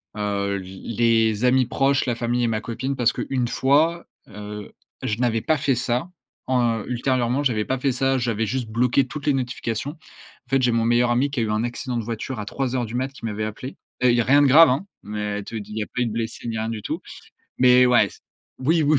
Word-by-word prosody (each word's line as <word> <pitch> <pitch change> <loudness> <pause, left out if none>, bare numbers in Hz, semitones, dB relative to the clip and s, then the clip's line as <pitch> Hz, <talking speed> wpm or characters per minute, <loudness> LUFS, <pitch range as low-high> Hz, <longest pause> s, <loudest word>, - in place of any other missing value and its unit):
heu, 100 -1 -1
l 95 +4 -8
les 115 -1 +3
amis 130 +1 +4
proches, 135 0 +1
la 120 -2 0
famille 120 +1 -1
et - - +2
ma 110 -1 0
copine, 130 +5 -3
parce 120 -3 +2
qu'une 130 -3 -2
fois, 155 +8 +2 0.2
heu, 105 0 -8 0.3
je 105 - -1
n'avais 115 -2 +1
pas 155 - +1
fait 140 -2 +1
ça, 120 +6 -1 0.4
en 120 -4 +1
ultérieurement, 125 +1 0
j'avais 115 -6 +1
pas 130 - -1
fait 135 +1 +1
ça, 135 +1 +1
j'avais 115 -3 -1
juste 120 +2 -2
bloqué 125 +4 +2
toutes 145 +2 -7
les 145 - +4
notifications. 125 -1 -3
En 150 -4 -20
fait, 135 -1 +2
j'ai 125 -1 +3
mon 115 -1 +2
meilleur 120 +1 +3
ami 125 +4 +2
qui 140 - -2
a - - +2
eu 110 - -2
un 110 +2 0
accident 120 +1 -4
de 115 - -2
voiture 115 +2 -5
à - - -6
3:00 125 +2 -2
du 110 - -9
mat, 130 +2 0
qui 135 - -17
m'avait 110 -1 -2
appelé 120 +5 -7 0.3
et 125 - +6
il 120 - +4
y - - +4
a - - 0
rien 140 +5 +5
de 145 - +5
grave, 155 +5 +8
hein, 135 +10 -1 0.2
mais 105 -1 -4
te - - -11
dit 105 -1 -6
il - - -6
y - - 0
a - - -6
pas 125 - -4
eu 120 - +1
de - - -3
blessé, 115 +1 -4
ni 115 -1 -3
rien 110 +1 -2
du 110 -2 -4
tout - - -4 0.6
mais 125 0 +6
ouais, 125 -1 +4
c - - -16 0.4
oui, 160 +5 +2
oui, 150 0 +3
120 Hz, 245 wpm, -23 LUFS, 110-130 Hz, 0.6 s, grave